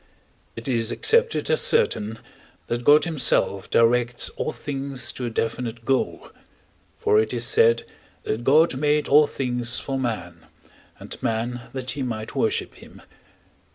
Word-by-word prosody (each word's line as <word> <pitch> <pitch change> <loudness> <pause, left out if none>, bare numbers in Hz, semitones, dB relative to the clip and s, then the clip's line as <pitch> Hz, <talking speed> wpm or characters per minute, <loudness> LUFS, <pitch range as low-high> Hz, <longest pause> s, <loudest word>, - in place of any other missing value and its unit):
It - - -8
is 115 -3 0
accepted 465 0 +2
as 475 - +3
certain, 110 - +1 0.5
that 120 0 -3
God 145 +5 +5
himself 120 - +1
directs 120 +1 +2
all - - -4
things 140 -3 -4
to 125 - -5
a - - -2
definite 115 0 -4
goal 135 0 -1 0.7
(for 105 - +3
it 110 - -1
is 120 0 0
said 115 0 +3 0.4
that 110 +2 -3
God 150 +3 +4
made 150 +1 +1
all 150 +1 +5
things 125 -3 -1
for 135 -1 -4
man, 90 -9 -5 0.5
and - - -9
man 120 +2 -3
that 130 -1 -3
he 140 - -5
might 110 -4 -4
worship - - -1
him). - - -16
125 Hz, 145 wpm, -23 LUFS, 115-140 Hz, 0.7 s, God